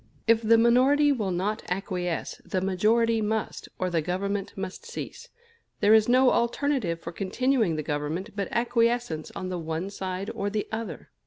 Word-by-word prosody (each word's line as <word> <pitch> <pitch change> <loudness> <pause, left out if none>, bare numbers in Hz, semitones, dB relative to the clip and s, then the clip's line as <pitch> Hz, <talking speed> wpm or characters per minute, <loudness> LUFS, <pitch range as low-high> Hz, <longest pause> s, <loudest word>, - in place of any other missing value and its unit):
If 230 0 +4
the 230 +1 +5
minority 260 +6 +5
will 220 -8 -1
not 195 +5 -1
acquiesce, 180 -2 -3
the 185 - -2
majority 220 +5 +2
must, 215 0 -2
or 185 -1 -1
the 165 -2 +1
Government 195 +4 -2
must 190 - -5
cease. 475 +1 -8 0.5
There 205 +2 +5
is 220 +1 +5
no 255 +1 +5
alternative 235 -7 0
for 170 - -7
continuing 215 +1 0
the 155 - -3
Government 150 +8 -3
but 200 -2 -2
acquiescence 235 -8 0
on 185 - -4
the 180 -1 -3
one 165 +4 -3
side 190 +2 -4
or 200 - -2
the 210 0 -2
other. 220 -8 -5
205 Hz, 165 wpm, -27 LUFS, 180-230 Hz, 0.5 s, the